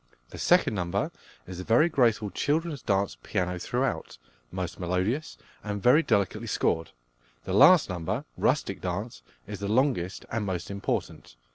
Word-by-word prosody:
The - - -9
second - - +3
number 90 -4 -1 0.3
is 90 -1 -8
a - - -4
very 120 - +4
graceful 115 - +2
"Children's 155 -2 -1
Dance," 100 0 0
piano 90 -3 -2
throughout, 125 - -2 0.3
most 90 -2 -5
melodious, 95 - -1 0.3
and 105 -1 -3
very 125 +10 +5
delicately 100 - 0
scored. 80 0 0 0.5
The 95 - -4
last 170 - +7
number, 85 -3 -3
"Rustic - - 0
Dance," - - -4 0.2
is - - -7
the 100 - -3
longest 110 -5 0
and 110 -1 -1
most 95 -1 -4
important. 100 -10 -4
100 Hz, 145 wpm, -27 LUFS, 90-125 Hz, 0.5 s, last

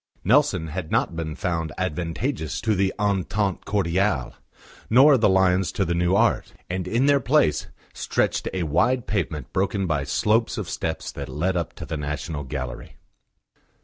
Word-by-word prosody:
Nelson 105 - +3
had 85 0 -5
not - - +1
been 80 -2 -4
found 85 -4 -2
advantageous 85 - -2
to 110 - +1
the 95 -1 +1
Entente 100 -1 0
Cordiale, 95 -7 0 0.6
nor 135 +5 +7
the 110 -5 +3
lions 95 -1 +3
to 95 - 0
the 85 - 0
new 85 +2 +2
art; 115 +3 +2 0.2
and 90 0 -3
in 120 +7 +1
their 140 0 +4
place 125 - +2 0.3
stretched - - -1
a 95 -2 -2
wide 115 - +1
pavement 80 - -3
broken 95 +1 0
by 75 -5 0
slopes 110 - +1
of 105 -5 -3
steps 80 0 -3
that - - -7
led 90 +5 -1
up 85 -3 -2
to - - -8
the 80 - -4
National 75 +1 -4
Gallery. 65 -2 -6
95 Hz, 160 wpm, -24 LUFS, 80-105 Hz, 0.6 s, nor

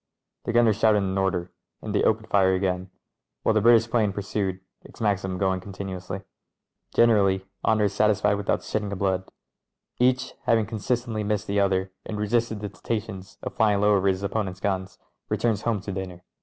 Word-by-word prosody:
The - - -1
gunner 115 -2 +4
shouted 105 -1 +3
an 95 0 -2
order, 90 -2 -1 0.3
and - - -5
they - - +2
opened 110 0 +1
fire 95 -2 +3
again, 95 0 -1 0.5
while 110 - +3
the 110 - +3
British 115 +1 +6
'plane 110 -3 +1
pursued, 95 -1 -2 0.2
its - - -16
Maxim 100 -3 0
going 95 -1 0
continuously. 95 -1 -6 0.7
Generally 100 -5 +4 0.2
honour 110 -1 +3
is 100 -1 +1
satisfied 105 -1 +3
without 100 -1 0
the - - -15
shedding 105 -1 -2
of 100 - -3
blood; 95 -1 -1 0.7
each, 125 +1 +2
having 115 -2 +3
consistently 115 +1 -2
missed 105 0 -1
the 100 0 0
other 95 -1 +1
and 110 - -5
resisted 110 0 0
the 105 - -4
temptations 95 0 -5
of - - -5
Sying 105 -3 +3
low 105 +1 +4
over 100 0 +2
his 95 0 +1
opponents' 100 -2 -2
guns, 95 -1 -2 0.3
returns 110 -3 0
home 115 -4 0
to 100 - -5
dinner. 90 -2 -6
100 Hz, 180 wpm, -25 LUFS, 95-110 Hz, 0.7 s, British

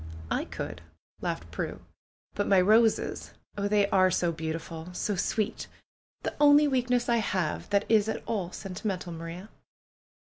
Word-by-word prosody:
"I - - 0
could," 80 +1 -6 0.4
laughed 85 0 -4
Prue. - - -4 0.5
"But 205 - -1
my 195 -2 +5
roses! 220 +4 +3 0.2
Oh, 200 0 -1
they 205 -1 +3
are 185 -1 +4
so 175 -1 +1
beautiful! 160 +1 -5
So 205 +2 -1
sweet! 215 +4 -1 0.6
The - - -2
only 295 0 +7
weakness 250 -2 +1
I 235 -1 +3
have 185 -7 -1
that 200 0 +2
is 220 -1 +3
at - - -3
all 200 -6 -2
sentimental, 185 -2 -4
Maria 165 +5 -7
200 Hz, 145 wpm, -28 LUFS, 175-220 Hz, 0.6 s, only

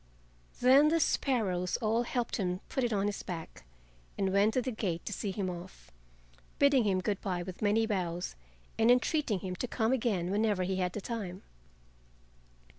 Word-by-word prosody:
Then 265 +4 +7
the 330 +2 +3
sparrows 200 - +1
all 225 0 +1
helped 240 0 -2
him 180 -2 -2
put 265 - -1
it 240 - 0
on 200 -2 +1
his 205 -1 -2
back 165 - -7 0.5
and 190 -1 0
went 205 +2 +3
to 255 - +3
the 255 - -2
gate 185 -7 -3
to 210 - -3
see 200 - -3
him 195 0 -2
off, 175 - -8 0.7
bidding 280 -4 +4
him 190 -2 +2
good 200 0 -2
by 180 -2 -2
with 185 0 -8
many 215 +2 +3
bows 180 -5 -2 0.4
and 225 +1 +4
entreating 250 - +2
him 185 -1 -4
to 250 - -3
come 230 +1 +1
again 205 -8 0
whenever 205 -2 +1
he 185 +1 -1
had 180 -1 -1
the 210 - -4
time. 195 -5 -5
205 Hz, 180 wpm, -31 LUFS, 185-235 Hz, 0.7 s, Then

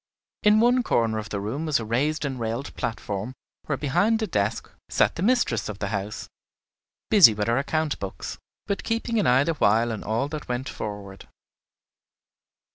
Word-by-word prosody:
In 210 +1 +5
one 245 +2 +4
corner 115 - +1
of 110 - -7
the 100 - -3
room 125 +11 -3
was 150 -5 +2
a 115 - -5
raised 145 +8 0
and 135 -3 -3
railed 115 +4 -3
platform, 105 +1 -4 0.3
where 145 - -1
behind 200 - +2
a - - +2
desk 105 - -1 0.2
sat - - +2
the - - -6
mistress 200 - +1
of 105 - -5
the 100 -1 -3
house, 105 0 -4 0.8
busy 190 - +8
with 105 +1 -2
her 120 +3 +2
account 155 +1 -1
books, 100 -1 -6 0.3
but 200 - -2
keeping 230 0 -1
an 205 - +2
eye 125 +2 +5
the 165 - 0
while 115 -3 +2
on 110 - -5
all 115 +6 -1
that 150 -1 -6
went 125 +2 -2
forward. 100 -4 -7
125 Hz, 180 wpm, -25 LUFS, 110-160 Hz, 0.8 s, busy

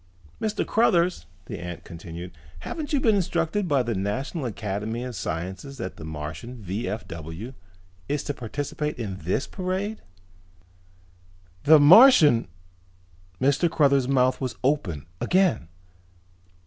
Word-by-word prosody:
"Mr. 215 -1 -1
Cruthers," 180 -6 +2 0.2
the - - -6
ant 90 -1 -7
continued, 85 +1 -8 0.3
"haven't 310 -3 -5
you 290 - +2
been 230 -4 +3
instructed 180 +1 0
by 140 -5 +2
the 120 -1 -2
National 130 - -3
Academy 110 +2 -4
of 125 -2 -6
Sciences 95 - -5
that 115 - -6
the - - -9
Martian 80 +9 -6
V.F.W. 95 - -5 0.6
is 145 - -1
to 145 - -3
participate 145 +5 -4
in 100 -6 -4
this 90 +10 -1
parade?" 190 +3 -3 1.6
"The 155 +1 +8
Martian 155 - +7 0.5
!!" 90 0 -32
Mr. 145 +6 +2
Cruthers' 140 -4 +3
mouth 130 -1 +2
was 130 -3 -3
open 110 - 0 0.2
again. 185 - +2
125 Hz, 120 wpm, -25 LUFS, -, 1.6 s, The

